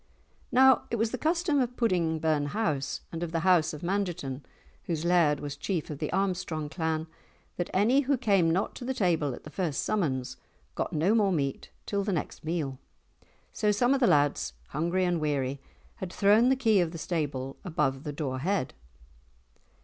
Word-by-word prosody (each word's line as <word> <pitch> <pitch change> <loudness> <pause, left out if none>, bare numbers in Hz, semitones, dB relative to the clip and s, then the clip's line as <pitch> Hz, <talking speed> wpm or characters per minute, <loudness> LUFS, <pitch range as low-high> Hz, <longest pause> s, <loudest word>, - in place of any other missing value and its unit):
Now 260 0 +5
it - - -1
was 225 0 0
the 255 - -2
custom 330 -2 +1
of 250 -1 -1
Pudding 175 -8 +1
burn 155 -2 +1
house 145 -7 -1
and 165 - -5
of 170 -2 -3
the 165 -1 -1
house 175 -3 +4
of 150 - -8
Mangerton, 175 -8 -2 0.4
whose 165 -1 -2
laird 170 -5 +3
was 145 -1 -5
chief 160 +1 -3
of 145 - -6
the 155 - -3
Armstrong 175 -6 -1
clan, 160 -1 -2 0.5
that 175 - -2
any 220 +8 +3
who 280 -1 +1
came 200 -8 +3
not 180 +4 0
to - - -8
the 260 +1 -2
table 165 - +1
at - - -14
the 155 - -10
first 165 -6 -1
summons 130 -11 -1 0.4
got - - -2
no 165 +7 +2
more 210 -4 +3
meat 140 -6 -2 0.2
till 200 -1 -1
the 200 -1 -1
next 160 - -4
meal, 155 -5 -2 0.7
so 210 -1 +1
some 245 +5 +3
of 275 - +1
the 245 - +4
lads, 145 - +2 0.2
hungry 170 +5 0
and 175 -2 0
weary, 140 -2 -1 0.4
had 185 -2 -5
thrown 210 +6 +4
the 265 - +4
key 225 -6 +3
of 175 -2 +2
the - - -5
stable 145 -6 -3
above 135 -7 -1
the 150 - -4
door 140 -3 -3
head. 185 0 -1
170 Hz, 190 wpm, -28 LUFS, 150-205 Hz, 0.7 s, Now